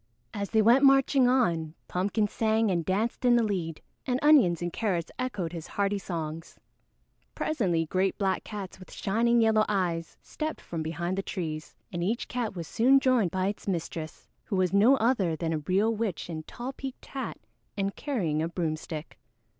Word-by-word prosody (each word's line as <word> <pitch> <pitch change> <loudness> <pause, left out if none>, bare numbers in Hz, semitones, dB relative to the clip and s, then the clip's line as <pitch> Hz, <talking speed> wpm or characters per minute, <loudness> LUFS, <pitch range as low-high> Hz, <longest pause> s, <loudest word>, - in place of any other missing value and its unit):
As 200 -1 -3
they 220 -1 +3
went 240 +5 +6
marching 270 -1 +5
on, 170 -11 +1
Pumpkin 205 +4 0
sang 220 0 +1
and 170 -2 0
danced 210 +9 -1
in 245 -1 +5
the 235 - +4
lead, 180 -7 -3 0.2
and 250 -1 +1
Onions 260 - +6
and 175 -1 -3
Carrots 180 -7 -1
echoed 195 -10 -2
his 165 -2 -6
hearty 200 0 0
songs. 165 -3 -6 0.8
Presently 180 - 0
great 185 +4 0
black 195 -2 0
cats 200 -4 -7
with 185 - -13
shining 230 +4 +2
yellow 220 -1 +4
eyes 175 -5 -1
stepped 310 0 -4
from 165 -2 -5
behind 170 +4 -2
the - - +1
trees, 160 -6 -5 0.2
and 170 0 -2
each 225 +7 -1
cat 235 -5 -3
was 170 -3 -5
soon 265 +4 +4
joined 255 -8 +3
by 185 +2 -1
its 205 +1 -3
mistress, 165 -3 -4 0.2
who 205 - -2
was 185 0 +1
no 220 +7 +6
other 220 -9 +1
than 165 0 -2
a 155 - -1
real 195 +8 +1
witch 210 -6 -3
in 160 -1 -4
tall 245 +11 -7
peaked 265 -1 -7
hat 270 - -5 0.4
and 195 0 -1
carrying 180 - -1
a 160 - 0
broomstick. 160 -2 -4
195 Hz, 180 wpm, -28 LUFS, 170-230 Hz, 0.8 s, went